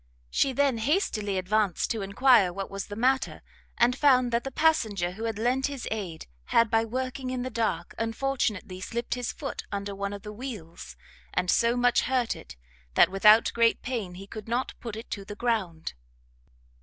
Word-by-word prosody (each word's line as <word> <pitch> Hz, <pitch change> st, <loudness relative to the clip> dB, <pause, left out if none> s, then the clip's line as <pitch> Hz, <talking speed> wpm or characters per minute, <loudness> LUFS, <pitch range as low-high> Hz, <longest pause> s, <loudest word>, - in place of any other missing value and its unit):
She 270 Hz, -, +2 dB
then 270 Hz, -2 st, +1 dB
hastily 220 Hz, -, 0 dB
advanced 195 Hz, 0 st, +1 dB
to 225 Hz, -3 st, -2 dB
enquire 200 Hz, 0 st, +4 dB
what 195 Hz, +2 st, -5 dB
was 195 Hz, 0 st, -5 dB
the 205 Hz, -, -7 dB
matter, 260 Hz, +4 st, +1 dB, 0.3 s
and 245 Hz, +1 st, +4 dB
found 255 Hz, -3 st, +4 dB
that 235 Hz, +1 st, +1 dB
the 270 Hz, -, -3 dB
passenger 220 Hz, -, +1 dB
who 220 Hz, +5 st, -6 dB
had 225 Hz, -2 st, -2 dB
lent 250 Hz, +4 st, +1 dB
his 280 Hz, -3 st, -6 dB
aid, 190 Hz, -7 st, -4 dB, 0.2 s
had, 230 Hz, -2 st, +3 dB
by 225 Hz, 0 st, +3 dB
working 255 Hz, +2 st, -3 dB
in 255 Hz, -1 st, -2 dB
the 255 Hz, -, -4 dB
dark, 220 Hz, -8 st, -1 dB
unfortunately 225 Hz, -5 st, -2 dB
slipped 235 Hz, +5 st, -3 dB
his 245 Hz, -1 st, -2 dB
foot 280 Hz, -, -5 dB
under 200 Hz, 0 st, -3 dB
one 200 Hz, 0 st, -3 dB
of 200 Hz, -1 st, -7 dB
the 210 Hz, -, -7 dB
wheels, 175 Hz, -, -8 dB, 0.4 s
and 180 Hz, -, +2 dB
so 235 Hz, +1 st, +3 dB
much 245 Hz, 0 st, +4 dB
hurt 250 Hz, -2 st, 0 dB
it, -, -, -11 dB, 0.4 s
that -, -, +6 dB
without 210 Hz, +3 st, +6 dB
great 230 Hz, -1 st, +3 dB
pain 220 Hz, -8 st, -3 dB
he 195 Hz, +2 st, -9 dB
could 215 Hz, +1 st, -9 dB
not 240 Hz, +3 st, -1 dB
put 230 Hz, -3 st, -6 dB
it 225 Hz, +2 st, -9 dB
to 200 Hz, -, -4 dB
the 205 Hz, +1 st, -8 dB
ground. 205 Hz, -9 st, -2 dB
225 Hz, 185 wpm, -27 LUFS, 200-250 Hz, 0.4 s, that